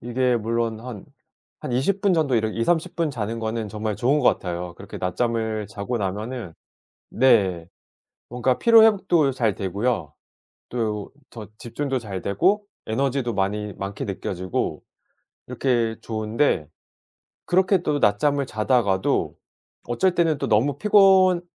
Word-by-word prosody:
이게 125 +1 0
물론 115 0 -2
한 120 -5 -8 0.6
한 - - -5
20 180 +12 0
분 200 -2 +3
정도 155 -6 +1
이렇 110 -1 0
20-30 165 +11 -1
분 165 -3 0
자는 115 -2 -4
거는 110 -1 -3
정말 105 -1 -3
좋은 135 +7 +2
것 125 - +4
같아요. 90 -1 -2
그렇게 - - -10
낮잠을 110 +1 -1
자고 105 +4 -4
나면은 105 0 -4 0.6
네 95 -9 +2 0.6
뭔가 125 +1 0
피로 230 -1 +7
회복도 185 -9 +3
잘 115 -6 0
되고요. 100 +6 -2 0.6
또 110 -4 -3 0.2
더 110 -3 -9
집중도 135 +3 -3
잘 100 -6 -6
되고 190 - +1 0.2
에너지도 130 0 -1
많이 105 +1 -2
많게 100 +2 -5
느껴지고 95 -2 -3 0.6
이렇게 120 -4 0
좋은데 110 - -1 0.8
그렇게 190 +2 +3
또 145 -3 0
낮잠을 140 +7 +2
자다가도 110 -4 0 0.5
어쩔 180 +10 +1
때는 165 -4 +2
또 - - -2
너무 130 +7 +2
피곤하게 190 -2 +5
115 Hz, 265 characters per minute, -23 LUFS, 105-140 Hz, 0.8 s, 피로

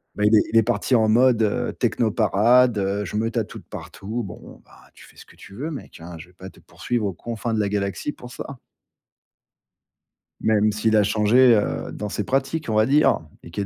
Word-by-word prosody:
Bah 105 - 0
il 105 +1 +5
est 105 - +6
il 115 - +3
est 115 - +6
parti 120 +3 0
en 110 -2 +3
mode, 120 +1 +4
heu, 105 - -1
techno 115 -3 0
parade, 115 +3 +3
heu, 100 +1 -2
je 95 - -7
me 110 +2 0
tatoue 115 - -4
de - - -18
partout. 110 +5 -6
Bon, 95 - -11
ben, - - -25 0.2
tu - - -16
fais - - -20
ce - - -13
que - - -20
tu - - -15
veux, 140 +10 -5
mec, 150 - -9
hein, 85 +1 -10
je 80 +2 -12
vais 90 - -23
pas 95 +1 -11
te - - -20
poursuivre 120 -3 -4
aux 100 - -2
confins 115 +4 -5
de 110 - 0
la 105 -1 0
galaxie 100 +7 -3
pour 125 -4 -13
ça. 140 +2 -8 1.8
Même 110 -1 +2
s'il 110 +1 0
a 105 - +5
changé, 115 +4 +4
heu, 105 - -2
dans 105 - -5
ses 105 - -3
pratiques, 135 +5 -2
on 110 - -1
va 110 0 +4
dire, 145 +5 +3 0.2
et - - -13
qu'il 95 +4 -4
y - - -2
110 Hz, 235 wpm, -22 LUFS, 100-120 Hz, 1.8 s, est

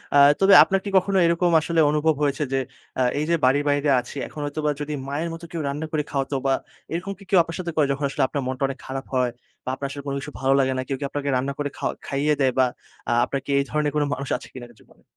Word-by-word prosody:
আ - - +7 0.2
তবে 195 0 +6
আপনার 195 0 0
কি 200 - -2
কখনো 195 +1 +2
এরকম 170 +1 +2
আসলে 165 +1 0
অনুভব 150 +1 +2
হয়েছে 145 +1 +1
যে 135 - +2 0.4
আ - - +3 0.2
এই 150 - 0
যে 170 - +4
বাড়ির 140 +3 +3
বাইরে 145 0 +1
আছি 125 +3 -8
এখন 150 - -10
হয়তোবা 150 0 -1
যদি 150 +1 -3
মায়ের 155 +4 -2
মতো 165 +1 -8
কেউ 165 - -3
রান্না 145 +3 -3
করে 150 -2 0
খাওয়াত 135 0 -2
বা 135 - +3 0.4
এরকম 185 +4 -3
কি 200 - -15
কেউ 190 - +4
আপনার 165 -1 -7
সাথে 170 -2 -3
করে 150 - +3
যখন 140 +1 -3
আসলে 140 0 0
আপনার 140 - -3
মনটা 130 +1 -3
অনেক 135 -1 -6
খারাপ 135 0 -5
হয় 125 -1 +2 0.3
বা - - -2
আপনার 140 +1 -4
আসলে 140 0 -7
কোনো 140 - -2
কিছু 145 +2 -7
ভালো 135 0 +3
লাগে 130 -1 +2
না, 130 - 0
কেউ 135 - -2
কি 145 - -5
আপনাকে 145 -1 -3
রান্না 135 +2 -2
করে 145 -1 -2
খাওয়া - - -2
খাইয়ে 145 +2 +1
দেয়? 130 -1 +4
বা 130 - +6 0.6
আপনার 140 - -2
কি - - -12
এই - - +2
ধরনের 150 -1 0
কোনো 150 - +2
মানুষ 135 0 -5
আছে - - -12
কিনা 120 -2 -8
জীবনে? - - -24
145 Hz, 255 wpm, -23 LUFS, 135-160 Hz, 0.6 s, আ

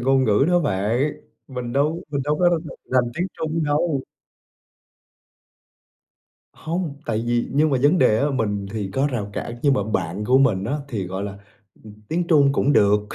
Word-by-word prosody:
ngôn 135 +1 +3
ngữ 105 +4 +3
đó 175 0 +4
bạn, 115 - 0 0.4
mình 125 -3 -5
đâu 150 +5 0
mình 140 -2 -1
đâu 150 +1 0
có 175 - +5
r 170 -2 0 0.3
rành 125 -2 +2
tiếng 180 - 0
Trung 160 0 -1
đâu. 145 -1 0 2.5
Hông, 160 -3 -4
tại 110 -1 -1
vì 120 0 0
nhưng 150 +2 +3
mà 135 - +2
vấn 150 +6 +4
đề 110 - +4
á 145 +3 +1
mình 105 -6 -1
thì 105 -3 -3
có 135 +2 +2
rào 115 -8 -3
cản 120 - -5
nhưng 140 -2 +4
mà - - +1
bạn 95 +3 -2
của 130 +4 +4
mình 100 -8 +2
á 135 +8 -1
thì, 105 -8 -3
gọi 95 +2 -4
là, 100 -1 -6 0.4
ừm, 105 -1 -12
tiếng 170 +2 -1
Trung 145 -5 +4
cũng 140 +1 +2
được. 105 -3 +4
135 Hz, 185 wpm, -22 LUFS, 105-150 Hz, 2.5 s, có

